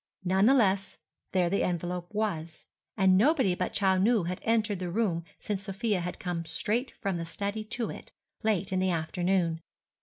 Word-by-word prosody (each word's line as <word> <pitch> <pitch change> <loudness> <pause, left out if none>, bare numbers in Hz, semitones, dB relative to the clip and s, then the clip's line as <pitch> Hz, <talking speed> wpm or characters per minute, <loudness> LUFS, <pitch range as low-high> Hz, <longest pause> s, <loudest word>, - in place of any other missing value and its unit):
None 190 +3 +3
the 270 - +6
less, 195 -5 +2 0.3
there 180 -2 +2
the 200 +3 +1
envelope 175 0 -2
was; 180 -7 -3 0.3
and 190 -2 +5
nobody 260 - +4
but 180 0 -2
Chou 190 -2 +2
Nu 215 0 +3
had 180 +2 -4
entered 220 -3 +1
the 180 -1 -3
room 180 -4 0
since 205 -2 -3
Sofia 200 +1 -1
had 180 +1 -4
come 175 -2 -3
straight 210 +10 -1
from 195 -3 -1
the 165 - -3
study 200 +6 -3
to 235 +1 -2
it, - - -10 0.3
late 205 -3 +1
in 185 - +2
the 185 0 +2
afternoon. 175 0 0
190 Hz, 180 wpm, -29 LUFS, 175-215 Hz, 0.3 s, the